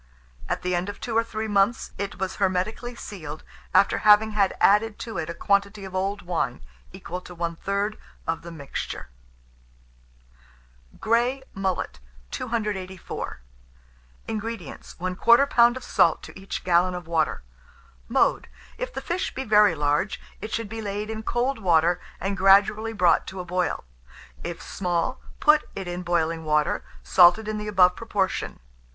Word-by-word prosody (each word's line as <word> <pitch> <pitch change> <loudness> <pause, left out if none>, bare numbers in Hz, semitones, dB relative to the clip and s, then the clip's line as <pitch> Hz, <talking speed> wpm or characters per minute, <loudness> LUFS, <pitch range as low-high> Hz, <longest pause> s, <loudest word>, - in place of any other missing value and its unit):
At - - -2
the 180 0 0
end 175 +3 -1
of 205 - -7
two 230 - -4
or 230 - +4
three 220 -1 -4
months, 205 +2 +1
it 200 0 -4
was 190 0 -3
hermetically 200 +5 -1
sealed, 155 -9 -8 0.3
after 200 - +4
having 215 +1 +6
had 200 -2 +1
added 210 +1 +4
to 225 -7 -5
it 160 0 -4
a 170 - -4
quantity 200 +1 0
of 190 - -9
old 195 +1 -2
wine, 175 - -2 0.3
equal 180 - -7
to 180 - -11
one 170 0 -2
third 200 +4 -2 0.3
of 165 0 -2
the 170 - -9
mixture. 140 - -6 1.9
GREY 240 +4 +1
MULLET. 190 - -2 0.3
284. 205 - -4 0.9
INGREDIENTS. 220 -7 -6
1/4 235 +9 +4
lb. 240 -1 +5
of 260 - -8
salt 165 - +3
to - - -10
each 195 - -5
gallon 180 +1 +3
of 180 -1 -6
water. 160 -2 0 0.7
Mode. - - +2 0.3
If - - -3
the - - -5
fish 360 +2 -2
be 265 - -2
very 210 -6 +5
large, 150 +6 0 0.2
it 215 +2 -6
should 230 -2 -2
be 225 +2 -6
laid 210 +1 -3
in 220 0 -4
cold 240 +3 -1
water, 175 -3 +3 0.2
and 195 +1 -2
gradually 200 +3 +4
brought 180 -5 +3
to 190 - -7
a 180 - -5
boil; 180 +1 -1 0.6
if 175 - -5
small, 175 -3 -2 0.2
put 300 0 +4
it 195 -2 -5
in 175 0 -4
boiling 165 -2 0
water, 150 -1 +1 0.2
salted 180 +4 +6
in 215 0 -2
the 210 - -5
above 180 -3 +5
proportion. 200 -4 -2
195 Hz, 155 wpm, -25 LUFS, 175-220 Hz, 1.9 s, having